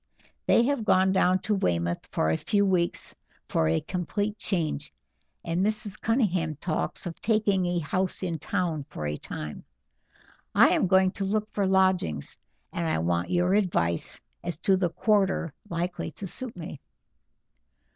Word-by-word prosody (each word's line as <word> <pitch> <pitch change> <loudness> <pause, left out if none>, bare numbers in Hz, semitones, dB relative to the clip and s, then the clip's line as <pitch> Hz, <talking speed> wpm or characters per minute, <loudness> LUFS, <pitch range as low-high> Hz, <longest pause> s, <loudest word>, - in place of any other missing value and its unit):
They 235 - +5
have 275 -2 0
gone 190 -2 +4
down 185 -1 +3
to 215 - 0
Weymouth 85 - 0
for 80 - +1
a - - +2
few 200 - +1
weeks 180 -3 0 0.3
for 80 - +1
a 80 0 +2
complete 205 +4 -2
change; 160 -6 -1 0.5
and 170 +2 0
Mrs. 215 -1 -2
Cunningham 190 - +1
talks 155 +4 -2
of 170 -2 -6
taking 205 -4 +2
a 175 0 0
house 185 +4 -1
in 170 -3 -2
town 170 -7 -1
for 75 - -5
a 75 0 -1
time. 75 0 -6 0.9
I - - +7
am - - +2
going 190 +1 +4
to 200 - -4
look 215 +2 -1
for 200 -2 +1
lodgings, 185 - +1 0.3
and 170 -1 -1
I - - +1
want 85 +2 0
your 180 +1 +2
advice 125 - +1 0.2
as 175 -3 -3
to 195 - +5
the 185 -2 +1
quarter 195 -4 +1 0.2
likely 175 +1 -2
to 200 - -6
suit 230 +3 -3
me." 160 -4 -7
180 Hz, 155 wpm, -27 LUFS, 160-195 Hz, 0.9 s, I